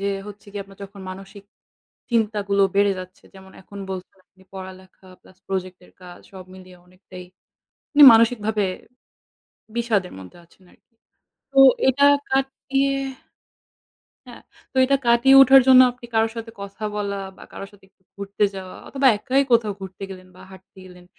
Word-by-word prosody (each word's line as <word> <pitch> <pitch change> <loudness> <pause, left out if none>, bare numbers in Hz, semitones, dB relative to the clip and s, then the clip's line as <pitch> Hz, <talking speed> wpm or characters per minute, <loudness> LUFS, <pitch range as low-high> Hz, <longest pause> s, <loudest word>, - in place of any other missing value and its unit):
যে - - -5 0.2
হচ্ছে 205 0 -14
গিয়ে 200 -1 -5
আপনার 195 -1 -19
যখন 195 0 -14
মানসিক 195 +1 -12 0.7
চিন্তাগুলো 210 -3 0
বেড়ে 200 0 +3
যাচ্ছে, 185 +1 -11
যেমন 190 0 -16
এখন 200 +1 -13
বলছেন 185 +1 -9
আপনি 190 - -25
পড়ালেখা 185 0 -12
প্লাস 185 - -22
প্রজেক্টের 185 -1 -6
কাজ 175 -1 -13
সব 190 -1 -11
মিলিয়ে 185 -1 -15
অনেকটাই 185 0 -14 0.7
আপনি 295 - +2
মানসিকভাবে 220 -2 +1 1.1
বিষাদের 220 -6 -1
মধ্যে 95 - -13
আছেন 170 +3 -27
আরকি। 235 - -31 0.6
তো 270 - -1 0.3
এটা 275 +2 +2 0.3
কাটিয়ে 270 +1 -1 1.3
হ্যা, - - -12 0.4
তো - - -16
এটা 275 +1 +2
কাটিয়ে 235 +3 +4
ওঠার 270 0 +7
জন্য 255 -1 +8
আপনি 245 -1 -14
কারো 225 0 +2
সাথে 230 0 -7
কথা 200 +1 -10
বলা 200 -1 -3 0.2
বা - - -16
কারো 195 - -8
সাথে 200 -1 -22
একটু 190 - -45
ঘুরতে 200 +1 -2
যাওয়া 185 -1 -9
অথবা 275 -1 -1
একাই 265 +6 0
কোথাও 225 -3 +2
ঘুরতে 190 +1 -10
গেলেন 185 -1 -12
বা - - -16
হাঁটতে 190 0 -18
গেলেন, 180 -1 -16
200 Hz, 155 wpm, -21 LUFS, 190-230 Hz, 1.3 s, জন্য